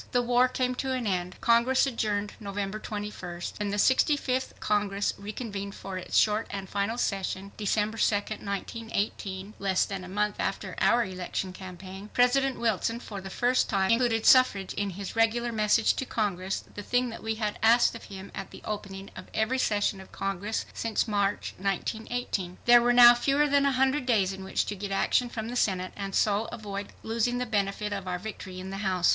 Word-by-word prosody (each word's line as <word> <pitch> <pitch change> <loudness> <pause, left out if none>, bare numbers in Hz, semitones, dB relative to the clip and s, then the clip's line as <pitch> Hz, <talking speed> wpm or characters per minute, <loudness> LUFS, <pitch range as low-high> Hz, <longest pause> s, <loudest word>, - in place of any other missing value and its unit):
The 245 0 +3
war 245 +1 +4
came 255 0 -1
to 265 -1 -2
an 255 -2 -2
end. 180 -2 -1
Congress 235 +3 +4
adjourned 210 -5 -1
November 200 0 -4
21st. 205 -5 -6
When 205 -1 -1
the 205 - -2
65th 260 +2 +2
Congress 205 -1 0
reconvened 200 -1 -6
for 195 -1 -7
its 180 - -2
short 215 +1 +3
and 195 -1 -5
final 200 +4 -1
session, 195 -3 -2
December 215 +1 0
2nd, 205 0 0
1918 200 -1 -3
[less 195 -2 +2
than 195 -2 -5
a - - -8
month 210 +2 0
after - - -2
our 240 0 +4
election 185 0 -4
campaign], 190 +2 -9
President 265 +2 +3
Wilson, 230 0 0
for 205 -5 -7
the 190 - -7
first 245 +5 +1
time, 195 -1 +2
included 230 -1 +2
suffrage 205 -7 +5
in 205 0 -1
his 195 +2 -6
regular 230 +1 +2
message 215 0 +3
to - - -1
Congress, 195 -5 -2
the 205 - -6
thing 245 +4 +1
that 225 - -8
we 220 0 -2
had 215 -2 -2
asked 230 +2 +5
of 230 - -9
him 195 -1 -9
at - - -6
the - - -12
opening 195 -2 -6
of - - -9
every 225 +4 +1
session 205 -4 +1
of 190 - -14
Congress 195 +2 -3
since 230 0 -1
March, 205 -1 0
1918. 200 -1 -2
There 240 0 +8
were 240 +1 +3
now 240 0 +10
fewer 275 +4 +2
than 280 0 +3
a - - +3
hundred 265 +1 +1
days 200 -6 +2
in 190 0 -8
which 190 - -1
to 205 - -4
get 200 +1 -5
action 220 +5 +2
from 225 -1 -5
the 245 - -5
Senate 185 -6 0
and 195 -1 -4
so 210 +1 +2
avoid 205 -3 -6 0.2
losing 230 +2 0
the 250 - -1
benefit 205 -2 -1
of 195 -2 -5
our 180 -1 -1
victory 185 -2 -7
in 190 +1 -6
the 195 - -4
House. 185 -3 +1
210 Hz, 190 wpm, -28 LUFS, 195-235 Hz, 0.2 s, now